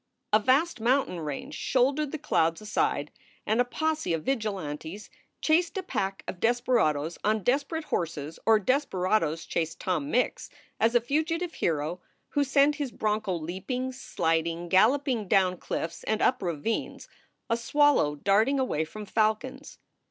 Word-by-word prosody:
A 215 - +7
vast 265 +7 +2
mountain 245 -6 +1
range 160 - -5
shouldered 275 +3 +1
the 315 - -3
clouds 165 - +1
aside 210 -8 -1 0.3
and 220 +3 +2
a - - +4
posse 310 - -1
of 160 -1 -2
vigilantes 195 - -3 0.3
chased 335 +3 +2
a 380 - -2
pack 195 - -3
of 180 - -5
desperadoes 225 - +1
on 215 -1 +1
desper 280 - +1
ate 320 - -4
horses 160 - -3
or 225 -1 +7
desperadoes 185 - 0
chased 160 -1 -2
Tom 160 -6 -1
Mix 250 - 0 0.3
as 230 +2 +2
a 240 - +5
fugitive 320 +7 -1
hero 160 +2 -1 0.3
who 290 - +1
sent 280 +2 +3
his 285 -5 -3
broncho 215 -4 -1
leaping, 190 - -3
sliding, 165 -8 -1
galloping 230 - +3
down 185 -2 +3
cliffs 165 0 -4
and 220 0 0
up 250 0 +2
ravines, 175 +4 -3 0.4
a 230 - +1
swallow 255 - +3
darting 210 - +2
away 250 - 0
from 210 +7 -8
falcons. 220 +7 -1
215 Hz, 145 wpm, -28 LUFS, 170-270 Hz, 0.4 s, A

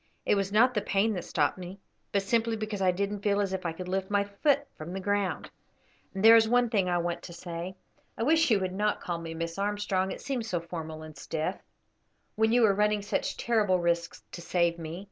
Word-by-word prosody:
It - - +3
was 200 -1 0
not 240 +5 +5
the 210 - 0
pain 205 +2 +1
that 180 -4 -4
stopped - - 0
me, 185 +2 -8 0.3
but 200 -1 +1
simply 230 +2 +1
because 215 -2 -4
I 185 - +4
didn't 200 +2 -1
feel 205 -1 +1
as 195 -2 0
if 185 -2 -2
I - - -1
could 180 +2 -7
lift 190 +1 -2
my 205 -1 +2
foot 280 +8 +1
from 160 +3 -8
the 190 - -3
ground. 205 -1 -1 0.6
And 195 +2 0
there 225 +1 +10
is 225 -1 +5
one 245 -1 +3
thing 195 -4 +2
I 175 - +2
want 170 0 -2
to 170 - -9
say: 175 +1 -6 0.4
I - - -1
wish 320 +4 +4
you 215 -4 +4
would 185 -1 -2
not 210 +2 0
call 170 -1 -3
me 165 -1 -6
Miss 165 +2 -4
Armstrong, 200 -2 0
it - - -6
seems 245 -5 -3
so 175 - 0
formal 160 -2 -7
and 155 -1 -10
stiff, 160 +4 -3 0.8
when 220 +1 +2
you 240 -1 +5
are 200 - +4
running 210 0 +1
such 205 - -2
terrible 215 -6 +2
risks 170 -1 -1
to 175 - -8
save 170 -1 +1
me. 165 +1 -6
195 Hz, 230 wpm, -29 LUFS, 175-210 Hz, 0.8 s, there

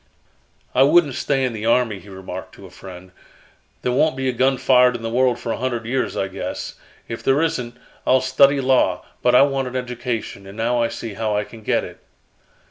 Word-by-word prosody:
"I 130 - +3
wouldn't 145 +1 +5
stay 135 0 0
in 125 - -2
the 110 0 -4
army," 115 -4 +2
he 100 - -15
remarked 95 -1 -8
to 100 - -13
a 90 - -13
friend. 95 0 -11 0.7
"There 125 - 0
won't 140 +2 +2
be 135 0 -1
a - - +2
gun 130 +2 +2
fired 125 -1 +4
in 115 - -6
the 115 - -3
world 125 0 +2
for 120 -1 -4
a - - -2
hundred 120 -2 -3
years, 130 +3 -2
I 95 - 0
guess. 95 +1 -5 0.3
If 115 - -6
there 135 +2 +2
isn't, 125 -7 -2 0.3
I'll 130 - +5
study 135 +2 +4
law, 130 -1 +2 0.2
but 125 0 +3
I 125 - +8
want 135 -2 0
an 125 - -7
education, 120 -5 -4
and 100 +2 -11
now 120 +2 +1
I 115 - +2
see 115 -2 -6
how 105 0 -1
I 105 - 0
can 115 +1 -13
get - - 0
it." - - -10
125 Hz, 215 wpm, -21 LUFS, 110-130 Hz, 0.7 s, I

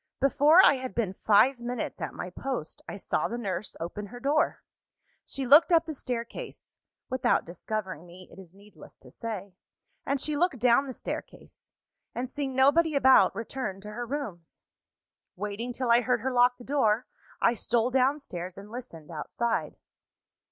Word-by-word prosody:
Before 295 +6 +6
I 280 - +5
had 255 0 -6
been 215 -6 -1
five 240 +6 +4
minutes 240 0 -4
at - - -4
my 180 - -6
post, 245 - -5
I - - -6
saw - - -1
the 235 - -4
nurse 200 -3 -4
open 205 +5 -5
her 245 +4 -10
door. 300 +5 +1 0.6
She 270 - -5
looked 295 +8 +7
up 330 -1 +5
the 315 - -5
staircase 245 -4 -6 0.4
(without 260 0 +1
discovering 185 -1 -5
me, 180 +1 -13
it - - -13
is 185 -1 -14
needless 205 +1 -15
to - - -16
say), 205 -4 -6 0.5
and 275 - -1
she 300 +2 -1
looked 335 -2 +1
down 245 +3 +3
the 260 - -6
staircase - - -8 0.4
and, 250 +1 -2
seeing 270 0 -4
nobody 295 +4 +4
about, 260 -9 +5
returned 225 -3 -5
to 210 - -8
her 240 +2 -5
rooms. 220 - -6 0.7
"Waiting 210 +5 -4
till 245 -1 -1
I 235 +1 +6
heard 245 -1 0
her 265 +3 -1
lock 245 0 +4
the 245 - -12
door, 245 -4 +1 0.3
I 235 - +4
stole 235 +2 0
downstairs, 250 - -1
and 200 +2 -11
listened 175 -11 -9
outside. 230 +9 -2
240 Hz, 165 wpm, -28 LUFS, 205-270 Hz, 0.7 s, looked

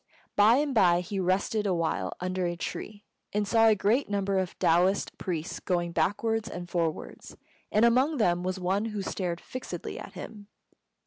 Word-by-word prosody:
By 210 +3 +6
and 285 0 +1
by 180 -6 +4
he 195 +3 -4
rested 195 +3 0
awhile 165 - -1
under 185 0 -1
a 175 - -2
tree, 205 +4 -6 0.3
and 205 0 0
saw 225 +1 +5
a 220 - +6
great 215 +7 +1
number 200 -1 0
of 185 -2 -3
Taoist 180 +4 +2
priests 170 -3 -3
going 175 -2 -1
backwards 215 +7 0
and 175 0 -6
forwards, 165 -3 -3 0.3
and 215 +3 +4
among 260 +6 +3
them 175 -6 +2
was 185 +1 -2
one 190 +4 0
who 210 -3 -3
stared 180 -3 -3
fixedly 255 +6 -6
at - - -9
him. 210 -2 -9
195 Hz, 170 wpm, -28 LUFS, 175-215 Hz, 0.3 s, By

